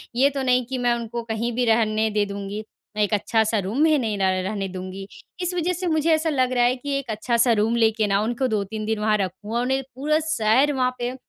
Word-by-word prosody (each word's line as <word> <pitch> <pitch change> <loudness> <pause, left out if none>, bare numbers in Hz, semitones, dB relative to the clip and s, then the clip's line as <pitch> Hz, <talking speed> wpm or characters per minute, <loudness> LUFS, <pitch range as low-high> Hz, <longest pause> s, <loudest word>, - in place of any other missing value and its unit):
ये 270 +3 +4
तो 280 -1 -4
नहीं 250 -1 +2
कि 260 +2 -4
मैं 245 -1 +2
उनको 235 0 -4
कहीं 225 +1 -2
भी 250 - +1
रहने 220 -1 +2
दे 210 0 +1
दूँगी 200 +1 -5 0.3
मैं 210 - +2
एक 205 - -1
अच्छा-सा 220 +1 +1
रूम 210 +10 0
भी 315 -1 +4
नहीं 220 -6 -1
र - - -4 0.2
रहने 195 0 -3
दूँगी। 185 +1 -7 0.3
इस 360 0 -1
वजह 355 0 0
से 360 +1 -3
मुझे 315 0 +2
ऐसा 315 +1 +1
लग 260 -4 +1
रहा 245 -1 +3
है 245 +1 +3
कि 275 +2 -3
एक 270 - -9
अच्छा-सा 235 +2 +1
रूम 220 +2 +1
लेके 220 -2 +2
ना 195 0 +2
उनको 240 +4 -1
2-3 215 -1 -3
दिन 220 0 -1
वहाँ 215 0 +2
रखूँ 200 +3 -4
और 240 - +1
उन्हें 265 +2 0
पूरा 300 +4 +1
शहर 255 +1 +3
वहाँ 255 -1 0
पे 245 +1 -3
235 Hz, 240 wpm, -23 LUFS, 215-260 Hz, 0.3 s, ये